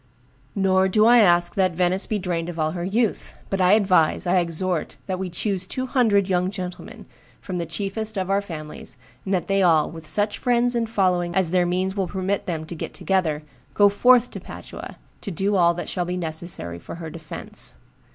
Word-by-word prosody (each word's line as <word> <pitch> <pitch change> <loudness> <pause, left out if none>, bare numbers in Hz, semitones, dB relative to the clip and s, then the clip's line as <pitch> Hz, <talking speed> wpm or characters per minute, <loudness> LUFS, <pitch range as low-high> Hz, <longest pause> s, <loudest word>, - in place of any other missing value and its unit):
Nor 190 -1 +3
do 215 +3 +3
I 240 +1 +7
ask 175 -4 +4
that 185 -2 +1
Venice 180 +2 +1
be 215 - -1
drained 175 -3 -2
of 170 - -7
all 155 -1 0
her 175 0 -4
youth; 210 +4 -1
but 195 -1 0
I 185 +2 +5
advise, 190 -7 +3
I 180 +1 +3
exhort, 175 0 -2
that 185 -1 -3
we 190 -1 -3
choose 185 +1 -2
two 255 +5 -3
hundred 225 -7 +2
young 180 -1 +1
gentlemen, 185 -3 -7 0.3
from 185 -2 -5
the 170 - -3
chiefest 205 +5 -3
of 185 -1 -1
our 195 +1 +2
families, 155 -9 -8 0.3
and 190 - -3
that 175 -2 -2
they 195 0 +2
all, 165 -4 +3
with 160 -1 -9
such 205 +3 0
friends 245 -1 +2
and 230 -2 -1
following 180 -5 +1
as 185 -4 +2
their 180 -1 +3
means 185 +2 -1
will 195 -3 -1
permit 190 +2 -2
them 160 -3 -3
to 165 - -7
get 165 - -6
together, 165 -6 0 0.3
go 205 -1 +6
forth 245 +4 +4
to - - -7
Padua - - -9 0.2
to 205 - -5
do 195 +3 0
all 170 -2 +4
that 175 - -5
shall 180 -2 -2
be 180 +1 -3
necessary 160 - -4
for - - -9
her 165 -2 -7
defence. 165 - -4
185 Hz, 205 wpm, -23 LUFS, 175-200 Hz, 0.3 s, I